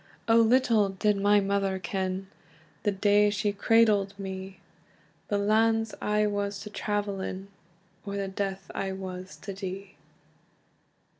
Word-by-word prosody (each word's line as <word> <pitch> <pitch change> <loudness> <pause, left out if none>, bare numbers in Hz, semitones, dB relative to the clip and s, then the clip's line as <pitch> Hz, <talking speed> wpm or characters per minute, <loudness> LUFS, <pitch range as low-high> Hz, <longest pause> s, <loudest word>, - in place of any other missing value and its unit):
"O 225 0 +5
little 230 -3 +4
did 205 +2 +1
my 205 +1 +4
mother 195 -1 0
ken, 190 0 -3 0.6
The 205 - +1
day 205 +1 +4
she 205 0 0
cradled 205 -2 +3
me, 190 -1 -7 0.7
The 205 - 0
lands 225 +2 +2
I 210 0 +2
was 205 -1 -2
to 210 - -8
travel 205 -2 -2
in, 190 +1 -5 0.5
Or 200 0 -4
the 195 -1 -2
death 195 0 -4
I 195 -1 -2
was 185 0 -7
to 200 - -5
die!" 195 0 -6
200 Hz, 135 wpm, -28 LUFS, 195-210 Hz, 0.7 s, O